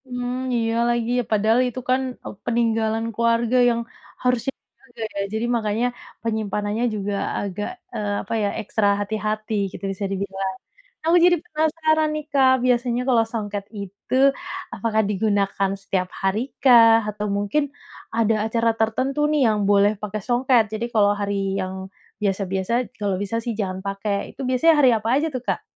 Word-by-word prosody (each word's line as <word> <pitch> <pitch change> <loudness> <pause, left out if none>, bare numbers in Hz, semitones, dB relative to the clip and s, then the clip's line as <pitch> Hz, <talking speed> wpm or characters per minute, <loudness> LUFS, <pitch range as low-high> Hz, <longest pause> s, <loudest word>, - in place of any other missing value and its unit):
Mmm, 245 0 -3 0.2
iya 225 -1 0 0.2
lagi 240 0 0 0.2
padahal 220 +2 +3
itu 250 +1 -5
kan 255 +1 +3 0.4
peninggalan 225 -1 +1
keluarga 235 +2 +2
yang, 235 0 0 0.4
harusnya 250 +1 +1
dijaga 240 -3 -17 0.2
ya - - 0
jadi 220 +2 -1
makanya 220 +1 0 0.4
penyimpanannya 215 0 -1
juga 205 0 -2 0.3
agak, 205 +1 -3 0.3
eee, 205 -1 -2
apa - - -6
ya - - +2
ekstra 215 0 0
hati-hati 215 +1 -3 0.2
gitu - - -10
bisa 200 +1 -4
dibilang, 195 -1 -3 0.5
aku 330 +2 +4
jadi 355 0 +6
penasaran 315 -1 +1
nih 305 - -3
Kak 265 -2 +5
biasanya 245 -1 +1
kalau 235 -3 +4
songket 205 -3 -4 0.2
itu 200 +5 -6 0.6
apakah 220 -1 +1
digunakan 200 -1 +1
setiap 185 -2 -1
hari 195 +2 +1 0.2
kah? 230 -4 +8
Atau 210 0 -4
mungkin, 205 +9 +1 0.5
ada 225 -1 +3
acara 230 +1 +1
tertentu 255 +6 0
nih 300 -2 +2
yang 215 -1 +1
boleh 205 +1 +5
pakai 210 0 -4
songket 245 -1 +4
jadi 220 +2 -2
kalau 205 -2 +4
hari 200 0 -1 0.3
yang 185 0 -4 0.5
biasa-biasa 195 -1 -1 0.3
kalau 200 -2 0
bisa 230 +3 -2
sih 235 - -1
jangan 190 -2 -2
pakai 200 +1 -2 0.2
itu - - -8
biasanya 290 +6 +4
hari 265 -3 +6
apa 220 +1 -3
aja 310 +3 +1
tuh - - -7
Kak? - - 0
220 Hz, 155 wpm, -23 LUFS, 205-245 Hz, 0.6 s, kah